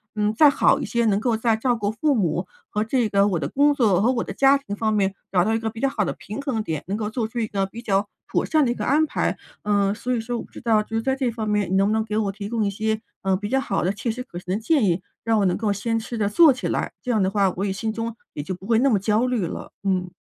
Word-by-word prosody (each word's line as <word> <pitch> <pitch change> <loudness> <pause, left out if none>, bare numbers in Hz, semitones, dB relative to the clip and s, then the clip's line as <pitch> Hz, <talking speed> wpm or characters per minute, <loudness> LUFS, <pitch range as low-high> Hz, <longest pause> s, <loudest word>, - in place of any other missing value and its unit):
嗯， 210 0 +1
再 295 +6 +7
好 280 - +3
一 - - -3
些， 235 -1 0
能 205 -2 +2
够 225 0 0
再 225 0 +2
照 245 +2 +1
顾 205 -2 -1
父 285 +5 +1
母 185 -7 0 0.2
和 210 0 -1
这 235 +1 +1
个 200 0 +3
我 180 -5 0
的 140 - -2
工 285 - +3
作 205 -8 +3
和 240 - +3
我 235 - -1
的 - - -6
家 275 +6 +5
庭 205 -7 -6
方 220 0 0
面 195 -2 +1 0.2
找 180 -2 +3
到 220 +4 +1
一 225 - +1
个 225 - -2
比 225 +1 -9
较 275 - +2
好 215 -6 -1
的 - - -2
平 215 +7 -7
衡 260 -6 -2
点， 160 -6 -3
能 200 - -2
够 215 -1 -2
做 225 -1 -1
出 230 +2 -10
一 225 - +1
个 195 -2 -1
比 230 +4 -10
较 200 -2 +1 0.2
妥 - - 0
善 310 -3 +3
的 240 - +1
一 - - +1
个 - - -4
安 300 +4 +3
排。 300 - -1 0.3
嗯， 200 -1 +2
所 245 +4 -4
以 - - -1
说 235 +2 -3
我 - - -5
不 - - -18
知 - - -10
道 225 -3 +3
就 220 +1 -6
是 225 - -1
在 265 0 +1
这 265 -2 0
方 225 -2 -4
面 210 -3 0
你 - - +2
能 195 +1 +4
不 215 - +1
能 220 0 +1
给 215 0 -3
我 205 -3 0
提 200 0 -7
供 225 -2 0
一 - - +1
些， 220 +2 -1 0.2
嗯， 190 -1 +1
比 205 - -4
较 265 +2 +2
好 195 - -1
的 185 +3 +1
切 230 +3 -4
实 250 +3 -3
可 175 -9 -8
行 180 +1 -3
的 210 - -2
建 290 +3 +2
议， 180 -1 +1 0.2
让 225 -1 +2
我 200 - +2
能 180 - +2
够 215 -2 0
先 225 +3 -1
试 230 +1 -6
着 210 -2 +1
做 300 +9 +6
起 255 - -3
来， - - -1
这 250 - -1
样 220 -3 +2
的 190 - +2
话 195 -1 +2
我 195 - -1
也 195 - -1
心 220 +3 -3
中 230 0 -4 0.2
也 145 - -4
就 185 +6 -4
不 185 +2 -13
会 225 0 +3
那 275 +3 +4
么 220 - +3
焦 215 +5 +1
虑 240 -8 0
了， - - -6
嗯。 185 -2 0
220 Hz, 345 characters per minute, -23 LUFS, 200-235 Hz, 0.3 s, 再